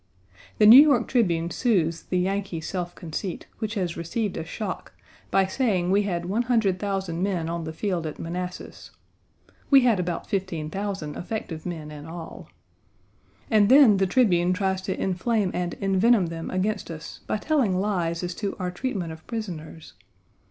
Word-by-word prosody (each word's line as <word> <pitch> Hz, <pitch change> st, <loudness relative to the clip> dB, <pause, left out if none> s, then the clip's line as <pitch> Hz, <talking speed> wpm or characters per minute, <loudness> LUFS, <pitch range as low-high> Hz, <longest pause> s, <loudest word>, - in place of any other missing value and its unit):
The 210 Hz, -, +5 dB
New 235 Hz, +6 st, +11 dB
York 280 Hz, -6 st, +4 dB
Tribune 175 Hz, -9 st, +1 dB
soothes 170 Hz, -8 st, +1 dB
the 185 Hz, -, +1 dB
Yankee 190 Hz, -1 st, -1 dB
self 175 Hz, +1 st, -4 dB
conceit, 170 Hz, +2 st, -5 dB
which 220 Hz, 0 st, -3 dB
has 180 Hz, -4 st, -2 dB
received 195 Hz, +5 st, -3 dB
a -, -, -3 dB
shock, 190 Hz, +4 st, -6 dB, 0.4 s
by 195 Hz, -, +3 dB
saying 190 Hz, -4 st, 0 dB
we 200 Hz, +1 st, +4 dB
had 175 Hz, -1 st, -2 dB
100,000 195 Hz, -5 st, 0 dB
men 185 Hz, -4 st, -1 dB
on 170 Hz, 0 st, -3 dB
the 160 Hz, -, -4 dB
field 170 Hz, -1 st, -2 dB
at 155 Hz, -, -6 dB
Manassas; 180 Hz, +2 st, -6 dB, 0.8 s
we 275 Hz, -2 st, +7 dB
had 235 Hz, -6 st, +3 dB
about 175 Hz, -1 st, -2 dB
15,000 190 Hz, -3 st, -3 dB
effective 175 Hz, -4 st, -5 dB
men 160 Hz, -4 st, -6 dB
in 150 Hz, 0 st, -9 dB
all. 165 Hz, 0 st, -9 dB, 1.0 s
And 210 Hz, -2 st, +5 dB
then, 260 Hz, -6 st, +7 dB
the 195 Hz, 0 st, +2 dB
Tribune 180 Hz, -6 st, +3 dB
tries 190 Hz, 0 st, -1 dB
to 190 Hz, 0 st, -4 dB
inflame 195 Hz, +1 st, 0 dB
and 175 Hz, -1 st, -2 dB
envenom 195 Hz, 0 st, +3 dB
them 165 Hz, 0 st, -5 dB
against 195 Hz, +2 st, -1 dB
us 165 Hz, -1 st, -8 dB
by -, -, 0 dB
telling 245 Hz, -7 st, +1 dB
lies 175 Hz, -4 st, -1 dB
as 175 Hz, 0 st, -3 dB
to 200 Hz, -2 st, -2 dB
our 180 Hz, -1 st, -3 dB
treatment 185 Hz, -5 st, -3 dB
of 160 Hz, 0 st, -12 dB
prisoners. 170 Hz, -9 st, -6 dB
185 Hz, 160 wpm, -25 LUFS, 170-210 Hz, 1.0 s, New